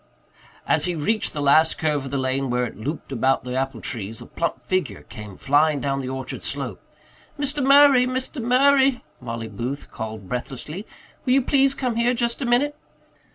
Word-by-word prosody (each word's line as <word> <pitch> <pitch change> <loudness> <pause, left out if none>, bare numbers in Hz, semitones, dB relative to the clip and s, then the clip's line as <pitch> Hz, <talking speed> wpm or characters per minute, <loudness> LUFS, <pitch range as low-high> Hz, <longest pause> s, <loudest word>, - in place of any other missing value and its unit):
As - - +2
he 180 -1 -1
reached 215 +8 0
the 145 - -3
last 155 +3 +4
curve 150 -3 0
of - - -5
the 140 - -2
lane 130 0 -1
where 125 0 +1
it 120 - -7
looped 140 +7 -5
about 135 +1 +1
the 125 0 -5
apple 135 -3 -2
trees, 110 -2 -5
a - - -8
plump 170 - -3
figure 160 - -2
came 105 -3 -10
flying 145 +1 +3
down 135 0 -1
the 130 -1 -4
orchard 130 0 -5
slope. - - -3 0.6
"Mr. 285 0 +1
Murray, 275 -2 +6
Mr. 260 +2 -3
Murray," 265 +2 +4 0.2
Mollie 115 -2 -5
Booth 120 +7 -5
called 110 -3 -6
breathlessly. 135 - -5 0.4
"Will 250 - +2
you 270 -1 +4
please 275 +1 +3
come 250 -4 -2
here 240 +1 +2
just 235 +1 -1
a 255 - -1
minute?" 275 +5 +2
150 Hz, 185 wpm, -23 LUFS, -, 0.6 s, Murray